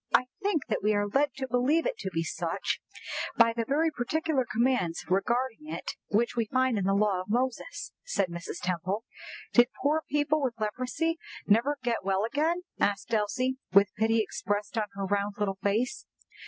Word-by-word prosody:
"I 255 - +4 0.2
think 395 -8 +1
that 225 - -1
we 210 +1 +2
are 205 0 +2
led 275 +7 +1
to 265 -1 -3
believe 260 +7 +2
it - - 0
to 190 - -3
be 165 -2 -1
such - - -2 0.6
by 230 -1 +6
the 230 0 -1
very 315 +4 +2
particular 295 0 0
commands 230 -8 +1
regarding 235 +9 0
it - - -4 0.2
which 230 +4 +1
we 230 -2 +1
find 255 -2 +2
in 190 - -1
the 195 +1 +3
law 200 -2 +2
of 185 - -10
Moses," 255 - -1
said 200 - 0
Mrs. 170 0 -6
Temple. 185 +5 -1 0.5
"Did 240 0 +7 0.2
poor 300 +3 +3
people 295 +1 +2
with 245 -4 -1
leprosy 255 +10 -1 0.3
never 235 +8 +3
get 235 -4 0
well 195 +2 +1
again?" 315 +8 0 0.2
asked 200 +3 0
Elsie, 255 +5 +1 0.2
with 200 +1 +6
pity 220 +1 +3
expressed 205 +1 -3
on 220 -2 +1
her 195 0 -2
round 200 +1 0
little 195 -2 -1
face. 230 - 0
230 Hz, 180 wpm, -29 LUFS, 205-270 Hz, 0.6 s, Did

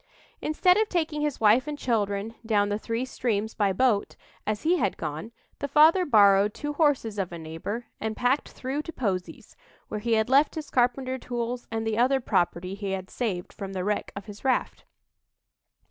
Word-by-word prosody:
Instead 360 +5 +3
of 435 0 +2
taking 315 -4 -1
his 295 -2 -1
wife 225 +6 +4
and 300 -1 -4
children 210 -4 -1
down 205 -2 +2
the 205 +1 -1
three 230 +3 -2
streams 220 -4 -2
by 205 -2 +1
boat, 215 0 +1 0.3
as 215 0 -1
he 345 +3 +3
had 200 - 0
gone, 155 +9 -5 0.3
the 285 - -2
father 315 +6 +5
borrowed 205 -4 +5
two 295 0 -4
horses 280 -9 +1
of 185 -3 -2
a 170 - -6
neighbor 165 +9 -5
and 220 0 -3
"packed 250 +4 +1
through 265 +3 -4
to 330 - -7
Posey's," 195 - -4 0.3
where 210 - -3
he 230 +2 0
had 220 -1 +2
left 275 +4 +4
his 310 -2 -6
carpenter 255 +1 +1
tools 240 0 -4
and 225 0 -3
the 220 0 0
other 265 +2 +3
property 180 -5 0
he 200 -1 -4
had 190 -1 -5
saved 195 -8 -3
from 195 -2 -7
the 185 -1 -2
wreck 210 +2 -1
of 200 - -7
his 205 -1 -11
raft. 265 -2 0
225 Hz, 190 wpm, -26 LUFS, 200-270 Hz, 0.3 s, father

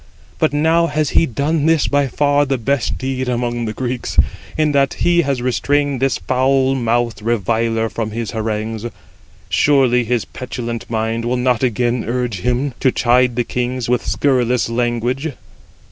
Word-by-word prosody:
But - - +2
now 160 +3 +2
has 155 -3 -1
he 165 - +3
done 145 +5 0
this 160 -3 +3
by 145 -1 +2
far 145 +2 +2
the 135 0 0
best 125 +1 -1
deed 130 -1 -3
amongst 120 -1 -1
the 110 - -3
Greeks, 125 0 -4 0.4
in 155 -1 +2
that 140 -1 +2
he 175 0 +3
has 135 -5 -1
restrained 140 +2 0
this 135 0 +1
foul 130 +1 +1
mouthed 120 -3 0
reviler 115 +1 0
from 110 -1 -4
his 110 0 -4
harangues. 110 0 -3 0.6
Surely 130 -4 +3
his 120 0 -1
petulant 120 -2 -6
mind 115 0 -1
will 120 +2 0
not 125 -2 +1
again 120 -1 0
urge 120 -4 -2
him 125 +6 -1
to 130 - +3
chide 125 0 +2
the 120 - +1
kings 125 +1 -3
with 125 - +1
scurrilous 125 -4 +1
language." 120 +5 -1
125 Hz, 160 wpm, -18 LUFS, 115-135 Hz, 0.6 s, he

